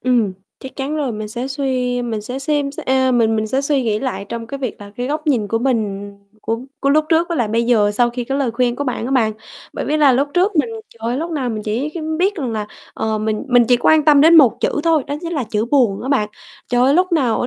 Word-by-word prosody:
Ừm, 235 -6 +1 0.3
chắc 265 - -10
chắn 280 +3 -3
rồi, 280 -5 -1
mình 215 0 -5
sẽ 240 +4 -4
suy 255 -3 -1
mình 225 -3 -3
sẽ 250 +5 -6
xem 285 0 -1
xe - - -7
ờ, 260 0 +2
mình 225 -2 +2
mình 215 - -1
sẽ 260 +5 0
suy 280 -1 0
nghĩ 215 -3 0
lại 215 -7 -4
trong 230 -1 -5
cái 275 +4 -6
việc 255 -6 -5
là 205 0 -10
cái 245 - -3
góc 305 +3 -3
nhìn 240 -8 +1
của 225 - 0
mình 210 -5 -2 0.3
của 225 0 -2 0.2
của 275 - +2
lúc 305 +2 +3
trước 330 +1 +2
với 340 - -2
lại 235 -6 0
bây 230 +2 +1
giờ 225 -4 +3
sau 240 +3 +2
khi 245 0 -4
cái 270 +3 -2
lời 270 -4 0
khuyên 240 +1 0
của 285 - -3
bạn 250 -4 -3
á - - -4
bạn. 235 -5 +2 0.4
Bởi - - -4
vì 305 - 0
là 290 -3 +5
lúc 275 +3 +1
trước 370 +2 +2
mình 300 - +2 0.2
trời - - -21
ơi, 245 - -1
lúc 330 +5 -3
nào 280 -6 -2
mình 215 -2 -4
chỉ 225 +7 -2
cái 335 - -4 0.2
biết 390 +3 +2
rằng 270 - -3
là, 215 -2 -3 0.3
ờ, 220 -1 -1
mình 215 0 -2
mình 245 -2 +5
chỉ 250 - +5
quan 310 +5 +3
tâm 295 -2 +6
đến 325 +3 +7
một 270 -8 +5
chữ - - 0
thôi, 325 -3 +2
đó 285 - -3
chính 340 0 -5
là 285 -6 -1
chữ 215 0 -1
"buồn" 240 -7 +2
á 260 - -5
bạn. 260 -7 +1 0.4
Trời 245 0 +2
ơi, 270 +2 +4
lúc 365 +2 +2
nào 260 -9 +2
ở - - -1
255 Hz, 280 wpm, -18 LUFS, 225-285 Hz, 0.4 s, đến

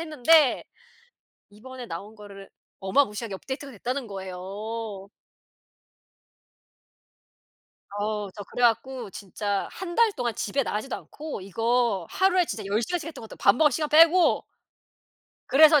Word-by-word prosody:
했는데 310 -2 +4 0.8
이번에 245 +4 -10
나온 205 +4 -7
거를 200 -2 -12 0.3
어마무시하게 210 +1 0
업데이트가 275 +7 -6
됐다는 250 +4 -4
거예요. 195 +2 -6 2.9
어 210 -1 -2
저 205 - -7
그래 245 - -3
갖고 240 -1 +1
진짜 200 +1 -3
1 350 -2 -6
달 460 -2 +5
동안 240 - -2
집에 245 +7 -1
나가지도 225 +2 -3
않고 305 -6 -8
이거 225 -1 0
하루에 370 -1 +3
진짜 220 -9 -5
10 205 +3 0
시간씩 335 +8 -3
했던 325 - -9
것 225 - -10
같아요 - - -10
밥 200 - +6
먹을 300 0 +5
시간 305 -2 -1
빼고. 330 +4 +5 1.0
그래서 300 +2 +7
235 Hz, 275 characters per minute, -26 LUFS, 205-290 Hz, 2.9 s, 그래서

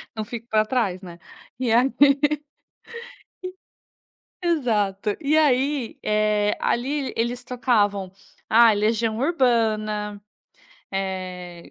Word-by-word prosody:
Não 220 - -3
fico 230 +2 -8
para 215 0 +2
trás 215 -7 -1
né. 175 -3 -10 0.4
E 245 -3 0
aí 250 +4 +3 2.5
Exato, 215 - 0
eh, - - -6
e 300 +2 +2
aí, 275 -3 +1 0.6
ali 270 +3 -1
eles 240 +2 -2
tocavam, 205 -6 0 0.4
ah, 230 0 +6
Legião 220 +1 0
Urbana, 220 -7 0 0.7
eh, 185 -2 -5
225 Hz, 90 wpm, -23 LUFS, 205-250 Hz, 2.5 s, ah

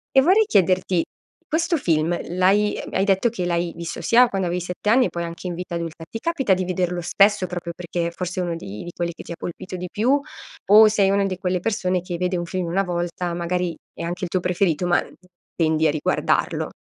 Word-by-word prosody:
E 265 - +8
vorrei 380 +9 +5
chiederti: 185 - +2 0.4
questo 335 +2 +1
film 165 - +1 0.2
l'hai 200 +3 +3
hai 190 - +1
detto 195 +4 +3
che 190 -6 -4
l'hai 170 -1 -1
visto 170 0 -6
sia 245 +2 +5
quando 190 -5 -2
avevi 175 +1 -1
7 180 +4 -3
anni 250 +3 +5
e - - -1
poi 170 0 -4
anche 170 +2 -6
in 175 - -3
vita 175 0 -5
adulta. 165 -1 -5
Ti 225 - -5
capita 270 - +1
di 185 0 -1
vederlo 180 -1 -1
spesso, 200 +2 +3
proprio 175 -1 -5
perché 170 -1 -3
forse 180 +1 -4
uno 175 -2 -2
di 105 -10 -7
di 175 - -7
quelli 170 0 -2
che - - -10
ti - - -10
ha 170 - -4
colpito 180 +2 -6
di 180 0 -5
più, 255 +7 +2 0.5
o 215 +1 +9
sei 205 -2 +3
una 200 0 +2
di 185 -2 -2
quelle 180 -1 -1
persone 185 -4 0
che 175 -1 -5
vede 180 +1 -1
un 175 - -3
film 180 0 -3
1 190 +4 +1
volta, 175 -1 -3
magari 175 0 -2 0.2
è - - -7
anche 175 +2 -3
il - - -6
tuo 185 - 0
preferito, 180 -2 +1
ma 175 - +4
n - - -12 0.4
tendi 160 -1 +2
a - - +3
riguardarlo? 150 0 0
180 Hz, 225 wpm, -22 LUFS, 170-195 Hz, 0.5 s, o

